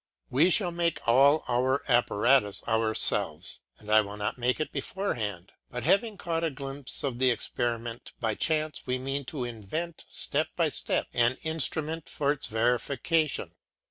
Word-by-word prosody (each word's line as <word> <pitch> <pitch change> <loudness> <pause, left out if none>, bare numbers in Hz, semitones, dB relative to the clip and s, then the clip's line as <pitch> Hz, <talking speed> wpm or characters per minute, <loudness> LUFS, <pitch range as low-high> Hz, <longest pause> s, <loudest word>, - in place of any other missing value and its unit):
We 150 +8 +4
shall 180 -1 +4
make 170 0 0
all 140 +6 +5
our 130 +3 +1
apparatus 120 -2 +3
ourselves, 110 -1 +1 0.2
and 105 0 -8
I 110 0 +7
would 100 0 -7
not 105 0 -2
make 125 +2 0
it 155 - -2
beforehand, 115 - -3 0.2
but 125 -2 -5
having 215 - +2
caught 165 -2 -2
a 165 - +1
glimpse 135 -1 0
of 130 -4 -2
the 130 0 +5
experiment 120 0 -2
by 110 -2 0
chance 155 +3 -1
we 125 0 0
mean 135 +2 -3
to 130 -1 -4
invent 120 - -5
step - - 0
by - - +2
step - - 0
an 120 +2 +2
instrument 160 0 -2
for 140 -1 0
its 145 - -2
verification. 125 +7 0
130 Hz, 155 wpm, -28 LUFS, 120-155 Hz, 0.2 s, I